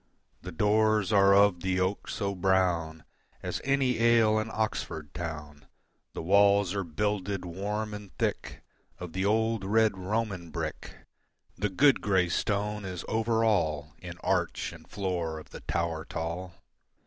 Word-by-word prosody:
The 90 - -7
doors 105 +2 +2
are 100 -1 +6
of 100 -3 +4
the 95 0 0
oak 95 +2 -1
so 100 -2 -2
brown 90 -4 +1 0.4
As - - -3
any 135 -3 +1
ale 115 -2 +4
in 110 +1 -3
Oxford 80 -9 -3
town, 75 -3 -7 0.5
The - - -5
walls 100 +1 +4
are 100 -1 -1
builded 100 +3 -2
warm 105 +5 -3
and 105 -2 -8
thick - - -3 0.3
Of 90 -2 -8
the 95 +1 -1
old 110 0 +1
red 110 +1 +3
Roman 95 -2 -3
brick, 75 - -5 0.6
The 105 +1 -1
good 135 +9 +4
grey 95 -3 +2
stone 105 +3 -1
is 90 -3 -6
over 115 0 +1
all 80 -9 0
In - - -8
arch - - 0
and 80 -2 -14
floor 90 -5 -2
of 80 - -11
the - - -9
tower 85 -2 -2
tall. 85 +2 -5
100 Hz, 150 wpm, -29 LUFS, 85-105 Hz, 0.6 s, are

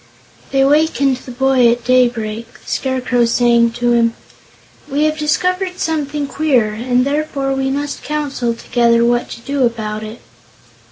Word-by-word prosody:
They 270 0 +2
wakened 280 -2 +2
the 255 - -11
boy 260 0 +3
at 240 0 -2
daybreak, 235 -3 0
the - - -20
Scarecrow 255 -2 0
saying 235 0 +3
to 240 0 0
him: 230 -1 +2 0.7
"We 290 +2 0
have 310 0 +1
discovered 365 +4 0
something 300 -2 -2
queer, 265 -8 +1
and 245 +3 0
therefore 280 -1 -1
we 270 0 -1
must 285 +1 -3
counsel 280 -6 -2
together 235 0 +2
what 240 0 +1
to - - -9
do 275 +2 -1
about 215 -3 -2
it." 220 +2 -8
255 Hz, 150 wpm, -17 LUFS, 235-285 Hz, 0.7 s, boy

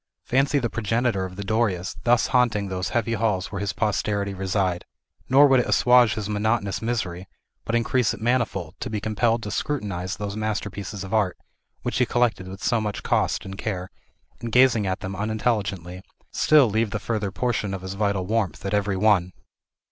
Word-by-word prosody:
Fancy 135 +3 +2
the 125 -4 +1
progenitor 115 -2 0
of 90 0 -8
the 100 - -5
Dorias 100 -3 0
thus 120 -1 +4
haunting 110 -6 +2
those 95 -1 -2
heavy 115 -1 0
halls 105 -4 0
where 100 -1 -4
his 100 -1 -1
posterity 100 -1 -1
reside! 95 -2 -1 0.5
Nor 140 +3 +7
would 135 -2 +5
it 125 - 0
assuage 125 -4 +5
his 105 -2 -3
monotonous 105 -2 0
misery, 100 -6 -3 0.4
but 115 - -1
increase 120 0 +2
it - - -6
manifold, 110 -8 0
to - - -4
be 110 - -2
compelled 115 +2 0
to 105 - -5
scrutinize 100 -9 -3
those 100 0 -4
masterpieces 105 -2 -4
of 95 +2 -7
art, 105 -5 +1 0.5
which - - -1
he - - +3
collected 120 -6 +1
with 95 +1 -9
so 120 -2 +2
much 105 -1 -4
cost - - 0
and 95 +1 -8
care, 95 -4 -4 0.5
and 115 - -5
gazing 120 -4 +4
at 95 +2 -2
them 95 -1 -5
unintelligently, 100 -4 -2 0.3
still 150 -4 +5
leave 110 0 0
a - - +2
further 105 -1 -2
portion 110 -2 -1
of 95 -1 -5
his 95 0 -5
vital 100 -2 0
warmth 100 -4 -1
at 95 - -2
every 100 -1 +1
one. 95 -3 +3
105 Hz, 185 wpm, -24 LUFS, 95-115 Hz, 0.5 s, Nor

